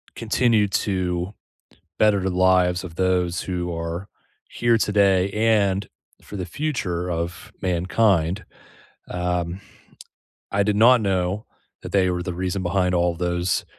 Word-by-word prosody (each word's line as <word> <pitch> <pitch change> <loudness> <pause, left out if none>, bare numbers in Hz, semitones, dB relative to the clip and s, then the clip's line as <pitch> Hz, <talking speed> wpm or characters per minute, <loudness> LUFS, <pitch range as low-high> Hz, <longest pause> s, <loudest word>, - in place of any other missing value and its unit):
continue 115 -2 +2
to 95 -2 -1 0.6
better 105 -2 +4
the 95 - -1
lives 90 0 +3
of 85 -3 -9
those 90 -1 +1
who 90 -1 -3
are 85 +3 -4 0.4
here 120 -1 +2
today 100 -3 +3
and 105 -2 +2 0.3
for - - -10
the 90 - -3
future 90 - -3
of 85 +1 -4
mankind. 90 0 +1 0.7
Um, 90 0 -2 0.9
I 100 - +2
did 105 0 0
not 120 +3 +6
know 95 +1 -1 0.4
that - - -8
they 95 -2 +3
were 90 0 -2
the 90 0 -4
reason 95 +1 -2
behind 90 0 +1
all 85 0 +2
those, 90 +1 -1
95 Hz, 130 wpm, -23 LUFS, 90-100 Hz, 0.9 s, not